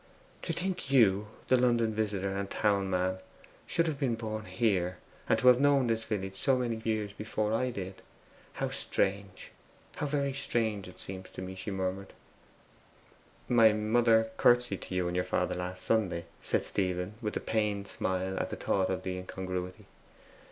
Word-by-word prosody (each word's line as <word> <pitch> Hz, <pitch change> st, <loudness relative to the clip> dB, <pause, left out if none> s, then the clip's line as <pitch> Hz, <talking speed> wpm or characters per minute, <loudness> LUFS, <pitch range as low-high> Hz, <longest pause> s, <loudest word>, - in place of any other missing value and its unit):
'To -, -, -3 dB
think 180 Hz, -2 st, -3 dB
YOU, 105 Hz, -6 st, +4 dB, 0.2 s
the 130 Hz, -, +5 dB
London 120 Hz, -3 st, +3 dB
visitor, 100 Hz, -3 st, -1 dB
the 100 Hz, 0 st, -2 dB
town 100 Hz, -2 st, +1 dB
man, 95 Hz, 0 st, 0 dB, 0.5 s
should 170 Hz, -, +2 dB
have 155 Hz, -4 st, -2 dB
been 130 Hz, -5 st, +1 dB
born 110 Hz, -1 st, -4 dB
here, 95 Hz, -7 st, 0 dB, 0.3 s
and 110 Hz, -, +4 dB
have 125 Hz, 0 st, +7 dB
known 140 Hz, -2 st, +4 dB
this 115 Hz, -1 st, 0 dB
village 95 Hz, -3 st, -3 dB
so 135 Hz, +4 st, +3 dB
many 120 Hz, -3 st, -1 dB
years 110 Hz, -2 st, -1 dB
before 105 Hz, +1 st, -2 dB
I 125 Hz, +3 st, +1 dB
did. 95 Hz, -5 st, -6 dB, 0.5 s
How -, -, -2 dB
strange 95 Hz, -1 st, -2 dB, 0.5 s
how 150 Hz, -, -1 dB
very 140 Hz, -1 st, 0 dB
strange 115 Hz, -7 st, -1 dB
it -, -, -13 dB
seems 95 Hz, 0 st, -8 dB
to 95 Hz, -, -7 dB
me!' 95 Hz, 0 st, -6 dB
she 95 Hz, +2 st, -6 dB
murmured. 95 Hz, 0 st, -3 dB, 1.3 s
'My 115 Hz, -3 st, +6 dB
mother 110 Hz, +1 st, +3 dB
curtseyed 120 Hz, -5 st, +4 dB
to 90 Hz, -, -6 dB
you 90 Hz, -1 st, +1 dB
and 85 Hz, 0 st, -2 dB
your 90 Hz, -, +2 dB
father -, -, 0 dB
last 90 Hz, +1 st, -4 dB
Sunday,' 95 Hz, -7 st, +1 dB, 0.2 s
said -, -, 0 dB
Stephen, 90 Hz, 0 st, -1 dB
with 105 Hz, -2 st, -2 dB
a -, -, -1 dB
pained 105 Hz, -2 st, -1 dB
smile 95 Hz, 0 st, -2 dB
at -, -, -2 dB
the -, -, -4 dB
thought 95 Hz, -1 st, 0 dB
of 95 Hz, -, -2 dB
the 90 Hz, -1 st, -3 dB
incongruity. 90 Hz, 0 st, -5 dB
105 Hz, 170 wpm, -31 LUFS, 95-115 Hz, 1.3 s, have